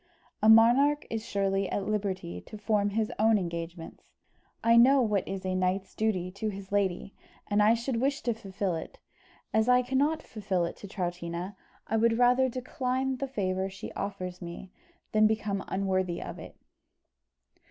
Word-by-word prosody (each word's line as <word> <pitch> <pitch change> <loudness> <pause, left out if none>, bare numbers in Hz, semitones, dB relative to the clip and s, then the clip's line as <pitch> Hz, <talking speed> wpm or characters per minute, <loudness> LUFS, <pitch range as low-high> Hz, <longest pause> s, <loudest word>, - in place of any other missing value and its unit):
"A 215 - +5
monarch 250 +7 +6
is 225 -1 -2
surely 195 -3 0
at 200 - -2
liberty 190 - -2
to 215 - -8
form 205 -1 +1
his 215 +1 -1
own 220 0 +5
engagements. 170 -2 -6 0.6
I 230 0 +5
know 260 +4 +7
what 210 -6 +1
is 195 -1 -5
a 185 - -1
knight's 185 +1 -1
duty 185 -5 -1
to 200 +3 -3
his 195 -1 -8
lady, 200 -1 0 0.3
and 205 0 +2 0.2
should 235 0 -2
wish 275 +2 0
to 240 - +1
fulfil 195 -3 -3
it; 160 - -7 0.6
as 220 +2 +3
I 250 0 +5
cannot 285 +5 +1
fulfil 195 -5 -2
it 170 - -5
to 200 - -9
Troutina, 175 0 -4 0.3
I 225 - 0
would 225 0 +3
rather 250 +2 +4
decline 255 +1 -2
the 275 +2 -3
favour 190 -6 -1
she 190 +2 -8
offers 185 -3 -5
me 175 +2 -8 0.4
than 215 0 +5
become 210 -2 -1
unworthy 190 -2 -1
of - - -7
it." - - -10
205 Hz, 165 wpm, -29 LUFS, 185-230 Hz, 0.6 s, know